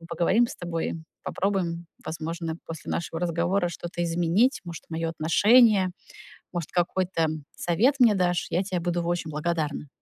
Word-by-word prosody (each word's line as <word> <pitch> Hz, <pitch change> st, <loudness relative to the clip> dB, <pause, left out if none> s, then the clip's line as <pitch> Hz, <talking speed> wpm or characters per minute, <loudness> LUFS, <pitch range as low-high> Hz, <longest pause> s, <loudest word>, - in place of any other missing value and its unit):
Мы 165 Hz, -, -12 dB
поговорим 190 Hz, +8 st, +2 dB
с -, -, -8 dB
тобой, 170 Hz, -2 st, -3 dB, 0.3 s
попробуем, 175 Hz, -4 st, -1 dB, 0.2 s
возможно, 165 Hz, +1 st, -4 dB
после 165 Hz, -2 st, -7 dB
нашего 165 Hz, 0 st, -3 dB
разговора 175 Hz, +2 st, +1 dB
что-то 175 Hz, 0 st, -5 dB
изменить. 175 Hz, +8 st, +2 dB
Может, 170 Hz, -1 st, -7 dB
моё 165 Hz, 0 st, -2 dB
отношение, 195 Hz, +4 st, +5 dB, 0.6 s
может 170 Hz, -3 st, -3 dB
какой-то 175 Hz, -1 st, +1 dB, 0.3 s
совет 225 Hz, -, +2 dB
мне 230 Hz, -4 st, +7 dB
дашь. 180 Hz, -2 st, +1 dB
Я 175 Hz, -, +2 dB
тебе 185 Hz, -2 st, -2 dB
буду 175 Hz, 0 st, -1 dB
очень 170 Hz, -2 st, -2 dB
благодарна. 150 Hz, -1 st, -2 dB
175 Hz, 145 wpm, -26 LUFS, 165-185 Hz, 0.6 s, мне